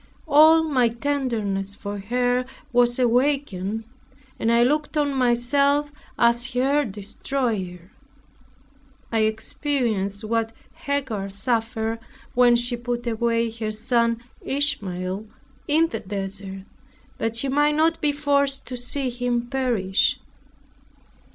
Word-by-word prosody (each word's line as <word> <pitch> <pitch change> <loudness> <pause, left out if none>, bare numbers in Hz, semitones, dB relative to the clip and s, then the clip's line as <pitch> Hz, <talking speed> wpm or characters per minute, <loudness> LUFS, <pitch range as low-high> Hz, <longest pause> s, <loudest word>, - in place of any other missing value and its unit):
All 315 +2 +7
my 260 -7 +2
tenderness 230 -7 -2
for 205 0 -6
her 245 +4 0 0.3
was 240 0 +3
awakened, 240 -5 +1 0.6
and 225 - +1
I 235 0 +5
looked 300 +4 0
on 290 -1 +1
myself 280 +4 +2 0.3
as 235 +2 +2
her 275 +4 +2
destroyer. 205 -3 -4 1.2
I 225 - +1
experienced 220 -2 0
what 225 +1 -1 0.2
Hagar 260 -9 -3
suffered 225 +2 -1 0.3
when 245 -1 +5
she 240 +1 +1
put 240 0 -3
away 230 0 0
her 220 -1 -4
son 230 +1 0 0.2
Ishmael 200 -8 -1 0.4
in 320 +2 +3
the - - -4
desert 195 0 -5 0.6
that 225 0 -1
she 230 +4 0
might 295 +2 +2
not 325 +1 +2
be 295 - +3
forced 280 -1 0
to 255 - -4
see 250 +2 -2
him 240 0 -2
perish. 230 -8 +1
240 Hz, 110 wpm, -24 LUFS, 215-275 Hz, 1.2 s, All